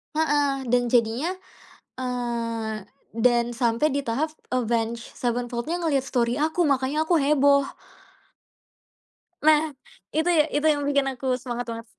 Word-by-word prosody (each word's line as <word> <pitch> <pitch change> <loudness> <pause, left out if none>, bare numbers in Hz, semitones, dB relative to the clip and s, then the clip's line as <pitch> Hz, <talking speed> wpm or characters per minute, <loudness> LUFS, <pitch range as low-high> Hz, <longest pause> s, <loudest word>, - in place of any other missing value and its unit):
Heeh, 290 -4 +1
dan 245 0 +2
jadinya, 240 +7 +2 0.7
eee, 230 -4 -3 0.3
dan 240 +1 +2
sampai 240 +4 +1
di 280 - 0
tahap 280 +5 -2 0.2
Avenged 235 -1 -1
Sevenfold-nya 245 +6 -2
ngelihat 285 -4 +2
story 245 0 0
aku, 320 +3 +1
makanya 280 +1 +1
aku 330 0 +2
heboh. 280 -1 +3 1.8
Nah, 310 -1 +7 0.6
itu 320 +3 +2 0.3
itu 295 +1 +1
yang 290 -1 -1
bikin 280 -1 +2
aku 260 +1 -9 0.2
semangat 245 -1 -4
banget. 230 0 -6
255 Hz, 120 wpm, -25 LUFS, 235-290 Hz, 1.8 s, Nah